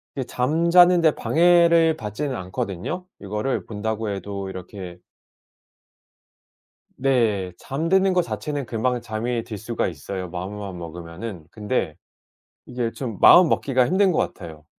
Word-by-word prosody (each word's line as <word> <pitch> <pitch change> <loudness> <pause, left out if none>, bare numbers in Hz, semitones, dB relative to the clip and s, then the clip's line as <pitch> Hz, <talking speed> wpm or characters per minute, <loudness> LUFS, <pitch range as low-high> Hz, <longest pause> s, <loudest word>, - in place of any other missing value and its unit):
이게 135 - -2
잠자는 170 +8 +4
데 160 -2 +5
방해를 170 -1 +4
받지는 130 +4 -4
않거든요. 95 - -4 0.2
이거를 105 +6 -2
본다고 110 0 -3
해도 100 0 -5
이렇게 90 -1 -8 2.0
네 115 -9 +1
잠드는 185 +7 +1
거 180 - +3
자체는 145 -5 -4
금방 120 +3 -1
잠이 115 +2 -3
들 110 -3 -7
수가 115 +3 -2
있어요 90 +3 -6
마음만 95 +1 -6
먹으면은. 85 +2 -8
근데 105 -7 -2 0.7
이게 120 -2 -3
좀 115 -6 -6
마음 175 -2 +8
먹기가 130 -2 +2
힘든 190 +1 +3
것 - - -1
같아요. 80 -4 -5
115 Hz, 275 characters per minute, -23 LUFS, 95-150 Hz, 2.0 s, 마음